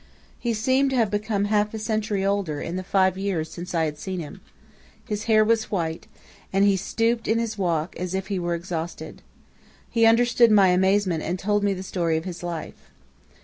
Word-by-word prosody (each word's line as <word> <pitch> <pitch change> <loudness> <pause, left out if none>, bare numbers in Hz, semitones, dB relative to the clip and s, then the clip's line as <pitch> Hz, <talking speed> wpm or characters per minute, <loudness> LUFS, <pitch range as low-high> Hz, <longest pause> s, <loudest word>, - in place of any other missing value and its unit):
He 235 -2 -1
seemed 260 +5 +2
to 265 - -1
have 225 -5 +2
become 205 -1 0
half 210 +1 +1
a - - -3
century 215 -2 -1
older 195 -7 -1
in 170 - -4
the 185 - -2
five 190 0 +1
years 180 -5 -2
since 175 0 -6
I 165 -1 +2
had 150 -1 -5
seen 190 -1 -4
him. 170 +4 -8 0.6
His 210 0 -4
hair 215 -1 +4
was 225 0 +1
white, 165 -5 -3 0.4
and 195 +1 +3
he 200 -1 +4
stooped 230 +4 -1
in 225 - +2
his 230 -1 -2
walk, 170 -4 -1
as 180 +1 -3
if 190 0 -2
he 195 -1 -2
were 175 -1 -1
exhausted. 170 -1 -6 0.7
He 230 -1 +4
understood 235 +1 +5
my 200 -3 +6
amazement 190 -2 +2
and 175 +4 -2
told 205 +2 0
me 200 -1 +1
the 185 - -6
story 170 -4 -1
of 160 - -5
his 180 -2 -6
life. 160 - -7
195 Hz, 200 wpm, -24 LUFS, 175-215 Hz, 0.7 s, my